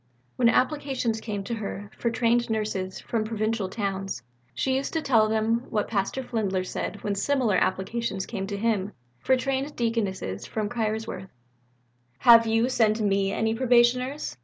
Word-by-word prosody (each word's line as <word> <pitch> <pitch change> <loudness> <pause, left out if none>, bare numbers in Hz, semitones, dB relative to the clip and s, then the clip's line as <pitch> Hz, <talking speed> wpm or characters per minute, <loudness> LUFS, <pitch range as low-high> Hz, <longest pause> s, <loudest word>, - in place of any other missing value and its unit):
When 240 -2 +4
applications 255 -4 0
came 205 -3 -4
to 235 - -4
her 205 -2 -5
for 235 - -1
trained 235 0 +1
nurses 210 -4 -2
from 225 -2 -2
provincial 215 -2 -1
towns, 195 - -3 0.3
she 260 - 0
used 275 - -3
to 320 - 0
tell 220 -5 +4
them 225 +2 +1
what 210 -2 0
Pastor 210 +5 -1
Fliedner 200 -6 -1
said 205 - -5
when 205 - 0
similar 245 +1 +1
applications 195 +1 -1
came 195 -4 -4
to 200 0 -4
him 205 -2 0 0.3
for 260 - +2
trained 270 +2 -2
Deaconesses 200 - -2
from 215 -2 -2
Kaiserswerth: 215 -4 -3 0.9
"Have 230 -2 +7
you 225 +2 +2
sent 225 -4 +2
me 195 -2 +1
any 220 +2 0
Probationers? 250 +3 +2
220 Hz, 155 wpm, -26 LUFS, 200-240 Hz, 0.9 s, Have